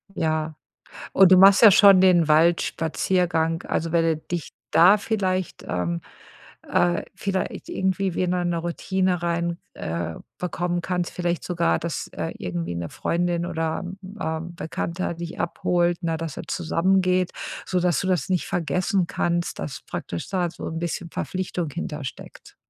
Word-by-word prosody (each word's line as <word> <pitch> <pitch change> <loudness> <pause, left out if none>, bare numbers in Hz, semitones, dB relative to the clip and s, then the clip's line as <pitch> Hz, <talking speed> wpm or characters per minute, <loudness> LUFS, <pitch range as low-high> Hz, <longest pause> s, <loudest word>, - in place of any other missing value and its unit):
Ja. 155 -1 -1 0.6
Und 190 -1 +6
du 185 - +9
machst 195 +3 +8
ja 215 -3 +10
schon 195 -1 +7
den 175 -4 +5
Waldspaziergang. 165 +1 +2
Also, 165 0 -2
wenn 170 -1 +3
du 160 -2 +1
dich 170 0 -5 0.2
da 185 +5 +7
vielleicht 190 -4 -2
ähm, 85 -1 -2 0.7
äh, 175 0 +2
vielleicht 190 -2 -3
irgendwie 190 -1 -1
wieder 180 -1 0
'ne 175 -1 0
Routine 180 +1 -1
rein 170 0 -1 0.2
äh, 85 0 -4 0.2
bekommen 175 -1 -2
kannst. 180 -1 -2
Vielleicht 175 -1 -2
sogar, 85 - +1
dass, - - -4
äh, - - -4
irgendwie 85 -1 -4
'ne 85 -1 -4
Freundin 175 0 -1
oder, 165 0 -2 0.4
ähm, 165 +1 -3
Bekannter 170 +2 -3
dich 170 0 -7
abholt, 175 0 +1
na, 165 -1 -1
dass 165 -2 -5
ihr - - -5
zusammen 185 +3 +1
geht, 185 0 +1 0.3
sodass 180 -2 +1
du 190 - -2
das 185 0 0
nicht 180 -2 +1
vergessen 180 +3 0
kannst, 175 0 -1
dass 145 - -5
praktisch 85 - -5
da 180 -3 0
so - - -7
'n 165 0 -4
bisschen 170 0 -3
Verpflichtung 180 -3 -3
hinter 150 -3 -5
steckt. - - -10
175 Hz, 150 wpm, -24 LUFS, 160-185 Hz, 0.7 s, ja